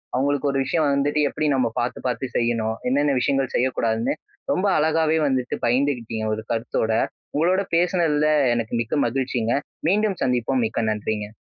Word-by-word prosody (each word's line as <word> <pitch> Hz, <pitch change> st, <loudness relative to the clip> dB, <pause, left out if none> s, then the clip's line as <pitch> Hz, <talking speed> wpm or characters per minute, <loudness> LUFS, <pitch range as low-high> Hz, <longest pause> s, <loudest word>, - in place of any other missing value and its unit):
அவங்களுக்கு 140 Hz, +2 st, +1 dB
ஒரு 135 Hz, -, 0 dB
விஷயம் 150 Hz, +4 st, +1 dB
வந்துட்டு 140 Hz, +2 st, +1 dB
எப்புடி 155 Hz, +2 st, -1 dB
நம்ம 130 Hz, -3 st, +2 dB
பாத்து 120 Hz, +1 st, -2 dB
பாத்து 125 Hz, +1 st, -2 dB
செய்யணும்? 115 Hz, -2 st, 0 dB
என்னென்ன 145 Hz, +3 st, +2 dB
விஷயங்கள் 135 Hz, 0 st, 0 dB
செய்யக்கூடாதுன்னு, 115 Hz, -3 st, 0 dB, 0.4 s
ரொம்ப 185 Hz, -, +1 dB
அழகாவே 160 Hz, +1 st, +2 dB
வந்துட்டு 130 Hz, -2 st, -1 dB
பகிர்ந்து 130 Hz, +4 st, +2 dB
கிட்டிங்க 110 Hz, -1 st, -5 dB
ஒரு 110 Hz, +1 st, -4 dB
கருத்தோட. 115 Hz, -1 st, -1 dB, 0.4 s
உங்களோட 180 Hz, +5 st, +2 dB
பேசினதில 165 Hz, -4 st, +2 dB, 0.3 s
எனக்கு 115 Hz, 0 st, -3 dB
மிக்க 115 Hz, +4 st, -3 dB
மகிழ்ச்சிங்க. 125 Hz, -2 st, -1 dB, 0.4 s
மீண்டும் 205 Hz, -1 st, +1 dB
சந்திப்போம். 125 Hz, 0 st, +1 dB
மிக்க 115 Hz, -, -2 dB
நன்றிங்க! 105 Hz, 0 st, -3 dB
130 Hz, 145 wpm, -23 LUFS, 115-150 Hz, 0.4 s, நம்ம